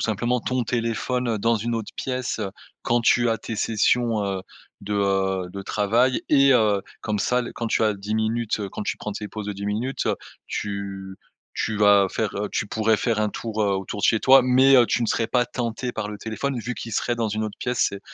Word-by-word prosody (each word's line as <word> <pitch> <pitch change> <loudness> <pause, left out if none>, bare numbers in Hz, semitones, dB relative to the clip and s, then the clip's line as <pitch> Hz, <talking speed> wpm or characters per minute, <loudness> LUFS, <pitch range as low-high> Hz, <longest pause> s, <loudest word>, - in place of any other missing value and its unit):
simplement 120 +3 0
ton 125 +1 -1
téléphone 115 +1 -1
dans 115 +2 +2
une 115 +2 -2
autre 115 -2 -4
pièce, 130 -2 -3
heu, 100 -3 -3 0.3
quand 120 0 +1
tu 120 +1 +4
as 115 - +1
tes 110 +2 -6
sessions, 115 0 +1
heu, 95 -1 -2 0.4
de, 105 +1 -4
heu, 95 -2 0
de 100 +1 -7
travail. 115 +6 +1
Et 140 -2 +6
heu, 105 -4 +3 0.2
comme 105 -1 -1
ça 125 +5 +1
le - - -7
quand 115 - -4
tu 110 - +1
as 105 - +3
10 100 +2 -4
minutes 110 0 0
quand - - -5
tu - - -2
prends 105 - -5
tes 105 0 -6
pauses 105 -1 -6
de 105 - -2
10 100 +1 -6
minutes, 115 +6 -2
heu, - - +1 0.3
tu 100 -1 -5 0.4
tu 110 - -1
vas 100 -1 +5
faire, 110 -2 -2
heu 105 0 -2
tu - - -1
pourrais 110 +1 +1
faire 110 0 0
un 105 - +2
tour, 110 0 -3
heu, 100 - +2
autour 95 +2 -5
de - - 0
chez 110 - +4
toi. 135 0 +7
Mais, 130 +2 +5
heu, 120 -2 +6
tu 120 - 0
ne 115 - +1
serais 115 - 0
pas 125 +1 +2
tenté 120 0 -3
par 105 -1 -4
le 105 - -6
téléphone 125 +4 -3
vu 120 +3 -4
qu'il 115 - -7
serait 120 - 0
dans 115 -2 -1
une 110 +1 -2
autre 105 - -6
pièce. 125 -1 0
C'est 100 - -7
110 Hz, 230 wpm, -24 LUFS, 105-120 Hz, 0.4 s, toi